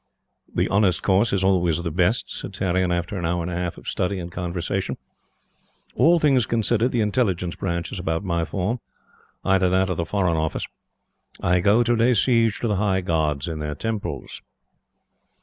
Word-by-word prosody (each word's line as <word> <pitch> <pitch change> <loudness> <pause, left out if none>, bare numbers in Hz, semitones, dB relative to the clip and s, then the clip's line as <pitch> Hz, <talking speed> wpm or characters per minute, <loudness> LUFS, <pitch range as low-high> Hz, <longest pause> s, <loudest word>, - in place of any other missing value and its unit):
"The - - +1
honest 100 -2 +2
course 100 +4 +3
is 100 -1 +1
always 90 -3 +2
the 85 - -2
best," 90 +8 +1
said 100 - -6
Tarrion 95 -1 0
after 85 +3 -2
an 85 - -3
hour 85 0 -1
and 90 - -4
a - - -3
half 90 -1 -3
of - - -13
study 95 +2 -1
and 85 -1 -6
conversation. 90 0 -3 1.0
"All 170 +2 +5
things 135 -8 +3
considered, 115 +1 +1
the 120 - +1
Intelligence 100 -5 0
Branch 85 -2 -3
is 95 - -5
about 80 0 -2
my 85 -3 0
form. 100 +8 -2 0.7
Either 95 -1 +3
that 95 +1 +2
or - - -1
the 85 - -1
Foreign 90 -2 0
Office. 80 0 -1 0.7
I 90 +1 +2
go 105 +6 +4
to 120 0 +2
lay 120 +2 +3
siege 115 -1 +2
to 120 - 0
the 105 -3 0
High 95 -2 +1
Gods 80 -5 0
in 80 -2 -4
their 75 -1 -3
Temples." 110 +5 -4
95 Hz, 185 wpm, -23 LUFS, 85-105 Hz, 1.0 s, All